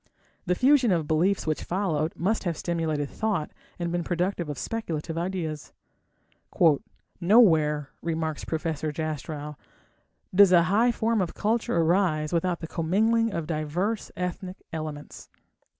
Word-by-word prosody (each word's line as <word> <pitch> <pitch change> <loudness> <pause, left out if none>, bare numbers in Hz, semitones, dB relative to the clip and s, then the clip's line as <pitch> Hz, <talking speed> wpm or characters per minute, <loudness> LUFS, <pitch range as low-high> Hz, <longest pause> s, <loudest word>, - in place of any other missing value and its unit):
The 180 - +2
fusion 260 0 +4
of 165 -4 +1
beliefs 175 +6 +1
which 155 -1 -1
followed 165 -4 -1
must 210 +6 0
have 170 -3 -1
stimulated 160 -4 -1
thought 195 -3 -2 0.3
and 170 -1 -3
been 175 0 -1
productive 175 -1 -1
of 145 - -4
speculative 165 -8 -4
ideas. 165 -4 -4 1.5
"Nowhere", 160 - +4
remarks 160 -2 -2
Professor 155 -1 -2
Jastrow, 150 -1 -5 0.8
"does 200 0 +7
a 175 -2 +6
high 215 +7 +3
form 230 -2 0
of 175 - -3
culture 225 -1 0
arise 165 -2 +2
without 170 +1 0
the 165 - -5
commingling 220 +8 +1
of 165 -5 -3
diverse 170 +7 -2
ethnic 180 +1 -5
elements." 155 -2 -7
170 Hz, 130 wpm, -26 LUFS, 155-195 Hz, 1.5 s, does